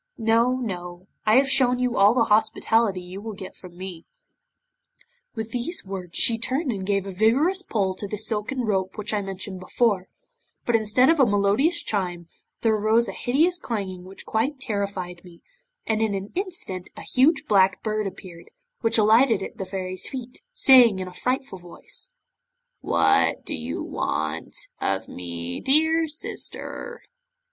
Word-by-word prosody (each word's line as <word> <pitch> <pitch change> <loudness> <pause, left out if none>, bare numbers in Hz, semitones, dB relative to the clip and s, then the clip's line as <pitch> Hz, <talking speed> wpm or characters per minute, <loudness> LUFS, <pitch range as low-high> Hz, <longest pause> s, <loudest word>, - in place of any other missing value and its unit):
No, 230 +3 +3
no, 180 -7 -5 0.2
I 215 - +5
have 270 +1 +5
shown 255 -2 +3
you 250 -1 0
all 205 +4 +5
the 240 - +4
hospitality 220 -2 +2
you 185 +2 -8
will 220 -1 -6
get 190 - -9
from 175 -2 -14
me." 180 -3 -7 1.3
'With 220 -1 -5
these 250 - -2
words 185 -3 -5
she 230 -1 +4
turned 265 +4 -1
and 195 -4 -4
gave 200 -1 +1
a 195 - -5
vigorous 260 - +2
pull 200 - -1
to 200 +2 -6
the 210 - -4
silken 220 +4 -2
rope 190 -4 -1
which 210 +1 -4
I 210 - +1
mentioned 195 -1 -6
before, 190 0 0 0.6
but 240 - +2
instead 225 +6 +4
of 330 - +1
a 265 - +7
melodious 210 - +2
chime, 180 -5 -2 0.3
there 225 -1 +3
arose 220 +2 +2
a - - -3
hideous 310 - +1
clanging 190 -6 -4
which 190 +1 -11
quite 260 +6 -1
terrified 200 -7 -4
me, 175 -2 -16 0.4
and 220 0 0
in 215 -2 +1
an 195 +1 -5
instant 350 - -3
a - - -8
huge 280 +4 +2
Black 195 -2 +3
Bird 215 -1 -1
appeared, 180 -3 -11 0.3
which 225 0 +2
alighted 220 0 +4
at - - -8
the 190 - -3
Fairy's 185 -1 -5
feet, 255 -2 -8
saying 260 - +6
in 185 -1 -4
a 180 - -9
frightful 255 -2 -2
voice 175 - -6 0.7
'"What - - +2
do - - -3
you - - -4
want - - -3 0.2
of - - -1
me, 85 -1 -5
my 320 +4 +4
sister?" 460 +9 -5
215 Hz, 165 wpm, -24 LUFS, 190-250 Hz, 1.3 s, a